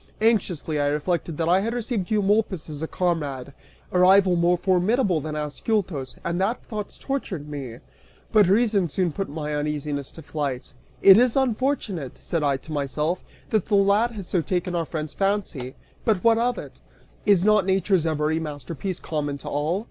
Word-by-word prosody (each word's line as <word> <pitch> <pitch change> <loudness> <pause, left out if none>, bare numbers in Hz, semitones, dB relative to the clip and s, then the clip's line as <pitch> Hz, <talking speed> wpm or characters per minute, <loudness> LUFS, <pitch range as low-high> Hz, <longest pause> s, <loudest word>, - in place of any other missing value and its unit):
Anxiously 180 -9 +1
I 145 - +2
reflected 155 +2 -1
that 165 - 0
I 180 +2 +4
had 230 +4 -2
received 230 -5 -2
Eumolpus 205 -4 +1
as 145 0 -6
a 160 - -2
comrade, 145 -8 -2 0.4
a 180 - +1
rival 185 0 +6
more 175 +1 +3
formidable 185 - +2
than 155 +1 -5
Ascyltos, 150 - -2
and 170 +2 -1
that 220 +6 0
thought 210 -2 -6
tortured 195 - -4
me. 135 -6 -6 0.5
But 210 -4 +5
reason 200 -3 +3
soon 180 +3 0
put 195 +5 -4
my 150 0 -4
uneasiness 150 -1 -3
to 160 - -11
flight.) 145 -4 -4 0.3
"It 195 0 +10
is 245 0 +4
unfortunate," 240 - -1
(said 165 - -2
I 140 -2 +2
to 160 - -9
myself,) 150 +4 -1 0.3
"that 215 -4 +1
the 210 - +2
lad 200 +4 +4
has 200 -4 -7
so 175 0 0
taken 180 0 -2
our 170 -1 0
friend's 155 -1 -5
fancy, 195 -10 -2 0.3
but 210 -6 +1
what 230 -1 +5
of 245 +1 +1
it? - - -9 0.5
Is 195 -3 +5
not 210 -3 +4
nature's 190 -3 +2
every 155 0 0
masterpiece 160 +4 -5
common 145 -2 -3
to - - -11
all? 150 +6 0
175 Hz, 175 wpm, -24 LUFS, 150-205 Hz, 0.5 s, It